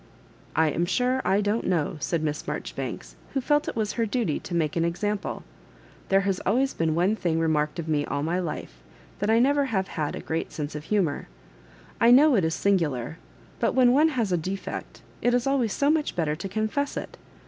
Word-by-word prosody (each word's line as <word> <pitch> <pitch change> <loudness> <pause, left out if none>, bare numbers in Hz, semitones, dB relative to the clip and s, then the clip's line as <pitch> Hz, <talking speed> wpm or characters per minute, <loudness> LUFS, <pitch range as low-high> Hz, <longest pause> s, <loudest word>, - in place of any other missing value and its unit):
I 160 -1 +3
am 170 +4 0
sure 250 +6 +1
I 195 +2 +2
don't 210 +3 0
know," 165 -5 0
said 165 +1 -1
Miss 150 -1 -1
Marjori - - -4
banks, - - -6 0.2
who - - +3
felt 295 +3 +1
it - - -3
was 215 -2 0
her 230 -2 0
duty 210 - 0
to 175 - -6
make 155 -3 0
an 165 - +1
example; 200 +5 -2 0.7
there 195 0 +4
has 195 -2 0
always 260 +7 +1
been 160 -1 0
one 180 +6 +2
thing 170 -6 -1
re 165 - +1
marked 150 0 0
of 165 -2 -4
me 150 -2 +1
all 145 - -2
my 170 +4 0
life, 155 - -5 0.4
that 205 - 0
I 225 - +5
never 280 +4 +3
have 195 -7 -1
had 150 -3 -3
a - - -5
great 160 +1 -3
sense 150 -1 -5
of 150 0 -6
humour. 180 -7 0 0.7
I 230 - +5
know 280 +4 +7
it 195 - +3
is 160 0 0
singular, 160 -7 0 0.4
but - - +1
when 250 -2 +6
one 300 +5 +5
has 235 -9 -1
a 175 - +3
defect, 190 +4 -5 0.2
it 245 0 +3
is 245 - +1
always 270 -5 +1
so 285 +7 +2
much 310 -2 0
better 155 -3 0
to 195 - -6
confess 220 +8 -1
it. - - -6
195 Hz, 215 wpm, -26 LUFS, 160-240 Hz, 0.7 s, know